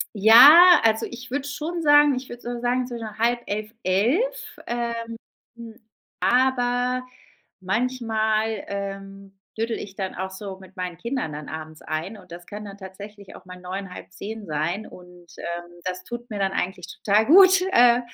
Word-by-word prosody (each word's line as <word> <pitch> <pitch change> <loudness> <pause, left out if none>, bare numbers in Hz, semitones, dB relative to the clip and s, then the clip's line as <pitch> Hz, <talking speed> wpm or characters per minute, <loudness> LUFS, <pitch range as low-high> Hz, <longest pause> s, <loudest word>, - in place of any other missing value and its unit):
Ja, 290 - +9
also, 225 0 +2
ich 245 +1 -10
würde 280 +2 -3
schon 330 +4 -4
sagen 290 -1 +5
ich 255 +1 -6
würde 240 0 -10
so 240 0 -5
sagen, 245 +1 0
so 240 - -6 0.2
10:30, 225 -2 -1
11:00, 260 - 0
ähm, 235 -1 -4 1.0
aber 250 0 +1 0.5
manchmal, 220 0 -1
ähm, 195 0 -7 0.2
dödel 225 +1 -2
ich 195 -1 -9
dann 190 -1 -5
auch 190 +1 -4
so 190 0 -8
mit 190 0 -16
meinen 180 -2 -5
Kindern 235 - -3
dann 150 0 -8
abends 155 0 -8
ein 160 +7 -4
und 180 -4 -16
das 175 0 -10
kann 210 +1 -8
dann 200 -1 -9
tatsächlich 200 +1 -11
auch - - -16
mal 180 0 -11
9:00, 185 +1 -6
9:30 205 +2 -9
sein 165 +7 -2
und, 180 -1 -15
ähm, 175 0 -6
das 185 0 -4
tut 240 +3 -8
mir 210 -4 -5
dann 195 0 0
eigentlich 180 -1 -3
total 210 +2 +2
gut, 375 +4 +7
äh, 245 -8 +5
215 Hz, 160 wpm, -23 LUFS, 190-245 Hz, 1.0 s, Ja